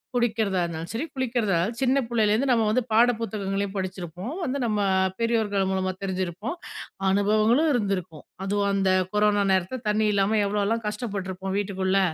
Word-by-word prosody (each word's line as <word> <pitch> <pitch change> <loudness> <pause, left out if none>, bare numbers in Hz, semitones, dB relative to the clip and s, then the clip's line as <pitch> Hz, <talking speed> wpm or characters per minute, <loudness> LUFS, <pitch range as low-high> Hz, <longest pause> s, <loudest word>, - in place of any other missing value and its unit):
குடிக்கிறதா 220 -6 +1
இருந்தாலும், 165 0 -5
சரி 245 +8 -2
குளிக்கிறதா 240 -6 0
இருந்தாலும் 215 +8 -1
சின்ன 270 +1 +3
புள்ளைலேருந்து 225 +2 +2
நம்ம 230 -2 +3
வந்து 255 +3 +2
பாட 235 +3 +6
புத்தகங்களையும் 200 -2 -2
படிச்சிருப்போம், 185 - -5
வந்து 270 -1 -1
நம்ம 215 -2 0 0.4
பெரியோர்கள் 215 -4 +1
மூலமா 185 0 0
தெரிஞ்சிருப்போம். 190 - -3 0.5
அனுபவங்களும் 215 +9 +3
இருந்திருக்கும். 190 - -2 0.2
அதுவும் 200 0 +1
அந்த 195 -1 +2 0.2
கொரோனா 210 -1 +3
நேரத்தில 190 +7 0
தண்ணீ 215 +1 +2
இல்லாம 200 +2 +2
எவ்வளோலாம் 210 +3 0
கஷ்டப்பட்டுருப்போம் 195 -4 -4
வீட்டுக்குள்ள, 190 -1 0
205 Hz, 140 wpm, -25 LUFS, 190-230 Hz, 0.5 s, பாட